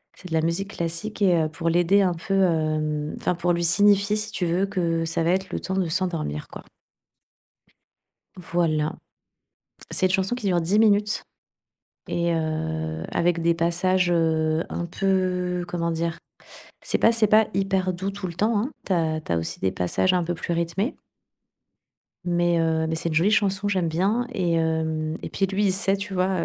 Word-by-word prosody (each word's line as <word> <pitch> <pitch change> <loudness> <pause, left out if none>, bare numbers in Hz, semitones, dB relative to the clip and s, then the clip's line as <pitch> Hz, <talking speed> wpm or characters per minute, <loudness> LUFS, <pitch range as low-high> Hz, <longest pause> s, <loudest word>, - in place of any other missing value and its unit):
C'est 185 - -12
de - - -5
la 160 - +3
musique 175 +5 -1
classique 170 +6 -3
et 185 -3 +4
heu, 155 - -1
pour 165 +2 -2
l'aider 175 +4 +3
un 185 -2 +2
peu, 170 +3 -4
hem, 155 -5 +1
enfin 180 - 0
pour 175 0 +1
lui 170 0 -1
signifier, 200 +4 +4
si 215 0 -3
tu 185 - -2
veux, 175 +3 +1
que 170 -4 -1
ça 165 0 -1
va 170 - +2
être 190 +1 -1
le - - -2
temps 190 - -4
de 190 -3 0
s'endormir 165 - -2
quoi. - - -10 1.7
Voilà, 165 -3 0 1.0
cette 185 -1 +1
chanson 190 +4 +1
qui 235 -5 -5
dure 175 -2 +2
10 185 +6 +1
minutes 210 -1 +3 0.9
et 170 0 0
heu, 80 - -3
avec 170 0 +1
des 170 0 +3
passages, 175 +2 +1
heu, 160 -1 +1
un 170 - -4
peu, 180 -1 0
comment 170 -1 -2
dire? 165 0 -2 0.6
C'est - - 0
pas 225 - +4
c'est 225 -2 +3
pas 215 +1 +5
hyper 190 -1 0
doux, 190 +3 -3
tout 195 -1 -5
le 170 - -6
temps, 215 +5 +1
hein. 255 +8 -2
Tu 195 - 0
as 160 -2 0
tu - - -7
as 85 - +2
aussi 80 0 -4
des 95 - 0
passages 95 - +1
un 180 -1 +2
peu 175 - -2
plus 170 0 -3
rythmés 170 +8 -1 1.3
mais 175 -1 +1
heu, 160 -1 +1
mais 160 - -1
c'est 170 - -2
une - - -3
jolie 170 +6 +3
chanson, 205 -2 +1
j'aime 185 -4 0
bien 195 +9 0
et 175 -5 0
hem, 160 -1 -1
et - - -6
puis, 195 - 0
lui 195 +2 -1
il 190 - +3
sait 195 0 +2
tu 195 0 -6
vois? 185 0 +1
175 Hz, 190 wpm, -24 LUFS, 165-195 Hz, 1.7 s, pas